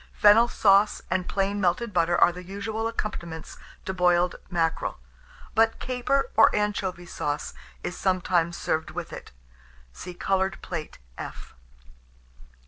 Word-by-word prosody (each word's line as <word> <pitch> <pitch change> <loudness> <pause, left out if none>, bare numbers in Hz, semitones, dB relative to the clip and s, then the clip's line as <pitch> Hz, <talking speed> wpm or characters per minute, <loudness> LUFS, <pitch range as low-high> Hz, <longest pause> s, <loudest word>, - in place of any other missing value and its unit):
Fennel 220 +3 +6
sauce 205 -2 +3
and 185 0 0
plain 200 +1 0
melted 195 +5 0
butter 175 0 +2
are - - +6
the 180 +1 -9
usual 205 +4 -3
accompaniments 170 -8 -5 0.3
to 190 - -2
boiled 180 -1 +3
mackerel; 165 -2 -1 0.6
but 225 0 +3
caper 255 +2 -1
or 225 - +7
anchovy 200 -4 -1
sauce 145 -3 -3 0.3
is 180 - -4
sometimes 175 -2 +1
served 160 0 -1
with - - -6
it. - - -9 0.6
(See 180 - -8
Coloured 190 0 0
Plate, 165 -4 -5 0.2
F.) - - -8
185 Hz, 130 wpm, -26 LUFS, 175-210 Hz, 0.6 s, or